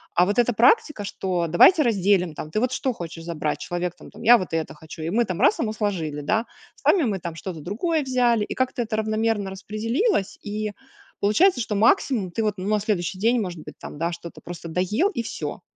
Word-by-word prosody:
А 175 - +5
вот 205 +4 0
эта 240 0 +3
практика, 365 - +3
что 185 -4 -2
давайте 300 - +6
разделим, 195 -6 +2
там. 155 - -6
Ты 215 - 0
вот 255 0 +1
что 260 -3 -1
хочешь 165 -3 -8
забрать? 155 -3 -2
Человек 175 0 -3
там, - - -14
там, - - -12
я 240 +1 +8
вот 185 - -6
это 160 -1 -2
хочу 160 +1 -10
и 165 - -2
мы 235 +3 +2
там 185 -5 -4
раз - - +4
ему 215 -2 0
сложили, 165 -9 -2
да. 220 +10 0 0.3
Сами 365 - +3
мы 205 -7 -1
там 170 -2 -6
что-то 170 -1 -6
другое 300 - -1
взяли 245 -4 +2
и - - -6
как-то 260 -1 -1
это 220 -1 -3
равномерно 215 -2 0
распределилось. 215 - -1
И 210 0 -3 0.5
получается, 245 - +4
что 210 - -2
максимум 220 - +2
ты 225 - -2
вот 210 -1 0
ну 185 - -5
на 215 - +2
следующий 195 -3 -2
день 235 +3 +3
может 180 -5 -5
быть - - -10
там, 145 - -9
да, 170 +1 0
что-то 170 0 -9
просто 175 -1 -8
доел, 200 - +1
и 240 - -3
всё. - - -5
205 Hz, 215 wpm, -24 LUFS, 175-235 Hz, 0.5 s, я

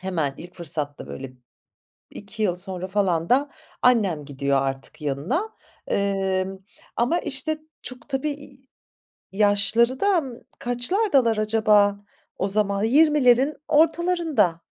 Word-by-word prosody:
hemen 165 -7 -2
ilk 175 +2 -11
fırsatta 150 -4 -4
böyle 130 -1 -8 0.8
2 205 +2 -7
yıl 180 -4 +1
sonra 185 0 -4
falan 185 -4 0
da 275 +3 +2 0.3
annem 200 -12 +3
gidiyor 140 -1 0
artık 135 +3 -5
yanına, 160 - -2 0.4
emm, 195 -1 -1 0.4
ama 250 +9 +1
işte, 310 +2 -2 0.2
çok 255 +1 -9
tabii, 275 +2 -1
iii, 275 -2 -11 0.6
yaşları 210 +5 +2
da, 400 -2 +3
ımm, 260 -7 -5 0.2
kaçlardalar 245 - +1
acaba 210 -2 +3 0.4
o 190 - -1
zaman? 200 0 +1
20'lerin 275 +1 +4
ortalarında. 320 - +2
215 Hz, 115 wpm, -23 LUFS, 180-270 Hz, 0.8 s, 20'lerin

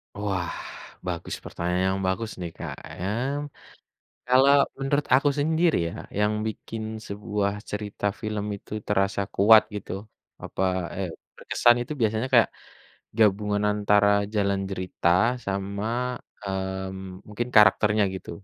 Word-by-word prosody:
Wah, 95 -4 -2 0.6
bagus 85 -1 -4
pertanyaan 90 +2 -1
yang 95 - -3
bagus 105 +4 -2
nih, 85 -2 -6
Kak - - -5 0.2
ya. 95 - -2 1.2
Kalau 130 +3 +6 0.2
menurut 140 +2 0
aku 145 +2 +4
sendiri 160 +2 +2
ya, - - -9 0.3
yang 105 +1 +2
bikin 110 0 -6 0.2
sebuah 100 0 -2 0.2
cerita 105 0 -4 0.2
film 105 -1 -3
itu - - -23 0.2
terasa 100 0 +1
kuat 110 +2 +8
gitu, 100 - -6 0.5
apa - - -3 0.3
eee 95 -3 -2 0.3
berkesan 120 0 +4
itu 150 - -5
biasanya 110 +3 +1
kayak - - +6 0.7
gabungan 105 -1 +3
antara 105 0 +3 0.3
jalan 100 -1 +1
cerita 90 -2 -2 0.4
sama 100 +1 -3 0.6
mmm 95 -1 -4
mungkin 120 +4 -3
karakternya 105 0 +5
gitu. 95 - -7
105 Hz, 120 wpm, -26 LUFS, 95-110 Hz, 1.2 s, kuat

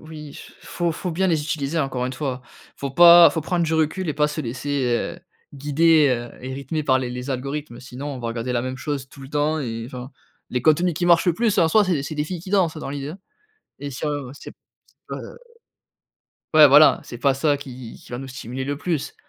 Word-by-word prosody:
oui, 155 -2 -10 0.2
faut 170 -1 -2
faut 180 +2 -4
bien 190 +4 0
les 160 -4 +1
utiliser 150 0 -2
encore 130 -4 -1
une 130 - -4
fois. 130 -2 -4 0.4
Faut 140 - -4
pas 170 +3 +9
faut 160 - -3
prendre 175 +2 0
du 160 - 0
recul 160 +3 0
et 150 - -1
pas 150 0 +2
se 150 +1 -4
laisser, 135 +2 -3 0.3
heu, 175 - -17 0.3
guider, 150 +2 +3
heu 120 -1 -2
et 130 +1 -5
rythmer 140 +3 -3
par 130 -2 +3
les 125 -1 -3
les 125 +2 -6
algorithmes. 140 0 -4
Sinon 130 +2 -8
on 140 -3 -5
va 120 - -4
regarder 115 +2 -3
la 120 -1 0
même 130 0 -5
chose 135 -1 -4
tout 140 - -14
le 135 - -10
temps 150 +2 0
et 115 -3 -4
enfin, 125 +1 -8 0.4
les 125 -1 -2
contenus 165 +3 +3
qui 175 - -2
marchent 170 0 +4
le 175 - +3
plus 225 -1 +1
en 165 - +4
soi 210 +4 +4
c'est 170 -7 0
c'est 150 +2 -5
des 150 0 -1
filles 175 +1 -5
qui 185 - -10
dansent 180 -6 +1
dans - - -6
l'idée, 140 0 -5
hein 185 - -10 0.6
et 145 +1 -6
si 135 - -6
on 145 -4 -3
sait - - -11
p - - -35 0.5
sais - - -3 1.4
pas 155 - +4
ouais, 150 - +11
voilà, 145 +3 +6
c'est 120 - -9
pas 135 +2 +2
ça 145 +1 +1
qui 130 -4 -10
qui - - -16
va 120 - -4
nous 135 - -7
stimuler 130 0 -6
le 145 +1 -3
plus, 160 -2 -3
145 Hz, 235 wpm, -22 LUFS, 130-160 Hz, 1.4 s, ouais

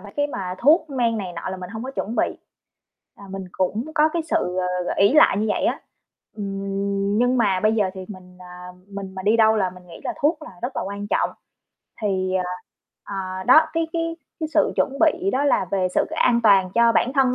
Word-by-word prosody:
mấy 205 -1 -12
cái 290 0 +2
mà 190 -10 -5
thuốc 310 +3 +4
men 235 -4 0
này 185 -3 -5
nọ 170 +2 -5
là 190 - -4
mình 180 -1 -8
hông 225 +1 -6
có 260 - -5
chuẩn 235 -4 -4
bị. - - 0 0.8
À, 200 - -13
mình 195 0 -6
cũng 205 +5 -1
có 310 -1 +4
cái 335 +1 -2
sự, 320 - -1 0.2
ờ, 180 0 -2
ờ, - - -1
ỷ 200 +4 +4
lại 305 - +6
như 215 - 0
vậy 205 - 0
á. - - 0 0.6
Ừm, 200 0 -2
nhưng 245 +2 +2
mà 195 -5 +2
bây 215 0 +3
giờ 205 -4 +1
thì 190 -1 -7
mình, 185 -3 -12
à, 180 0 -11 0.2
mình 195 -1 -7
mà 190 - -6
đi 210 +4 +3
đâu 220 -1 +5
là 190 -3 +1
mình 180 0 -15
nghĩ 165 - -11
là - - -2
thuốc 305 +1 +2
là - - -9
rất 245 +3 -3
là - - -1
quan 200 +1 -5
trọng. - - +1 0.7
Thì, 190 -2 0
ờ, 185 -1 +1 0.6
ờ, 185 -1 -5
đó, 255 +6 +8
cái 330 0 -1
cái 330 0 -2 0.2
cái 315 - -2
sự - - +3
chuẩn - - +2
bị 345 +4 +3
đó 275 +2 +1
là 285 - +2
về 190 -2 +1
sự - - +3
an 235 -1 +2
toàn 195 -4 +5
cho 235 0 +5
bản 250 +3 +1
thân 260 -2 +3
205 Hz, 230 wpm, -22 LUFS, 190-255 Hz, 0.8 s, đó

